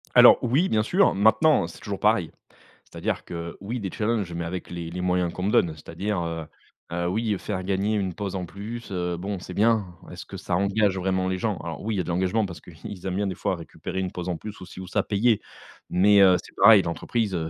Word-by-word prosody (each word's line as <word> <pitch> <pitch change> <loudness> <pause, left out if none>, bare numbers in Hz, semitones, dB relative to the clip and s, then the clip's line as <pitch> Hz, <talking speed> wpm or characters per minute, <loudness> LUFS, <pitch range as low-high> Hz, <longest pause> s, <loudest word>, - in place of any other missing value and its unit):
Alors - - +9
oui, 140 +10 +2
bien 110 -1 +2
sûr, 185 - +3
maintenant 110 - +4
c'est 85 - -12
toujours 100 -2 -5
pareil. 105 -6 +2 0.5
C'est-à-dire - - -4
que, 85 0 -6
oui 115 +5 -4
des 95 -3 -3
challenges, 105 -5 -1
mais 85 0 -3
avec 90 +1 -5
les 85 -1 -5
les 90 +1 -5
moyens 90 -1 +1
qu'on 90 - -5
me 105 - +1
donne. 80 -3 +3
C'est-à-dire, 100 +6 -4
heu, 80 -1 -4 0.5
heu, 85 +1 -1
oui 110 +2 0
faire 95 -3 -4
gagner 100 +3 0
une 95 -3 -1
pause 100 +1 -4
en 90 -1 -3
plus, 110 +6 -8
heu, 90 -2 -2
bon 95 +1 -4
c'est 90 - -8
bien. 110 -1 +3 0.3
Est-ce - - -8
que - - -8
ça 85 - -2
engage 100 +1 +2
vraiment 95 0 0
les 95 0 -1
gens? 105 -3 -1
Alors 80 -1 -6
oui, 110 0 -2
il - - -2
y 90 - +2
a - - -3
de - - -7
l'engagement 95 +5 +1
parce 90 -3 -8
qu'ils 90 +3 -10
aiment 95 - -2
bien 100 0 0
des 95 - -3
fois 95 - -1
récupérer 85 +2 -6
une 95 -1 -2
pause 90 0 -5
en 85 - -2
plus, 105 -1 -9
ou - - -7
ci 95 - -11
ou 95 - -7
ça, - - +1
payée, 110 +2 +2 0.5
mais 100 +3 +5
heu, 95 -2 +7
c'est - - -15
pareil 100 -1 +9
l'entreprise, 100 +5 -2
heu, 80 -2 -2
95 Hz, 245 wpm, -25 LUFS, 90-105 Hz, 0.5 s, Alors